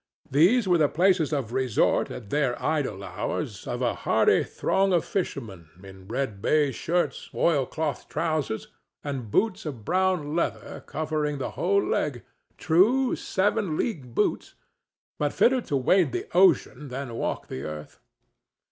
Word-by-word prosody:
These 190 - +4
were 175 -2 +4
the 150 -2 +4
places 180 -3 +2
of 130 -6 -2
resort 130 -4 +1
at 110 -5 -9
their 140 -4 0
idle 135 -11 -1
hours - - -4
of - - -3
a - - +1
hardy - - +2
throng 195 0 0
of 170 - +2
fishermen 110 - -4
in 95 -1 -13
red 115 -4 -3
baize 145 0 +2
shirts, 175 +8 -1
oilcloth 150 -1 0
trousers 155 -7 -2 0.4
and 135 -6 -4
boots 195 - +1
of 130 -9 -7
brown 180 - +1
leather 170 - -3
covering 150 -2 -2
the 135 - -4
whole 200 +3 +1
leg—true 180 - 0
seven 195 -4 0
league 135 - -3
boots, - - 0 0.6
but 145 -1 0
fitter 255 +1 +3
to 145 - -1
wade 145 +1 +3
the - - -2
ocean 155 -6 +3
than 130 -1 -5
walk - - -3
the 65 - -6
earth. 75 +1 -8
150 Hz, 140 wpm, -26 LUFS, 125-180 Hz, 0.6 s, These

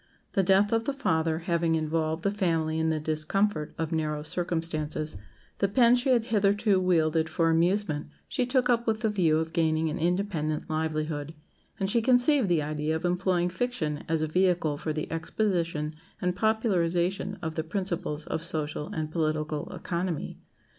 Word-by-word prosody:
The 195 - +3
death 195 +2 +4
of 230 0 +1
the 280 - 0
father 160 -10 +1
having 170 -2 +1
involved 160 +1 -1
the 200 - +2
family 165 -6 0
in 160 0 +1
the 160 -1 0
discomfort 155 +2 -1
of 160 0 -2
narrow 155 -2 -1
circumstances, 160 -2 -2 0.4
the 200 - +3
pen 235 +4 +5
she 250 +2 0
had 240 -3 +3
hitherto 205 -1 +3
wielded 160 -3 +2
for 165 0 +2
amusement 170 -2 +1 0.2
she 250 - -1
took 250 -1 +2
up 235 -1 +1
with 220 0 0
the 220 -2 +1
view 170 -6 +3
of 160 0 -2
gaining 160 -1 +1
an 180 - -4
independent 170 -4 -1
livelihood; 155 -1 -2 0.4
and 195 - 0
she 230 +4 +2
conceived 250 -1 +4
the 165 -4 +2
idea 150 +1 -1
of 160 - -3
employing 180 0 +1
fiction 180 -7 -2
as 160 -1 +1
a - - 0
vehicle 175 -2 +2
for 155 +2 -3
the 155 0 -2
exposition 165 -3 -1 0.3
and 180 -1 -1
popularization 195 -3 +1
of 160 -1 -2
the 160 - -2
principles 170 -4 -3
of - - -3
social 155 -2 -3
and 155 -1 -4
political 155 -2 -1
economy. 170 -2 -3
165 Hz, 165 wpm, -28 LUFS, 155-195 Hz, 0.4 s, pen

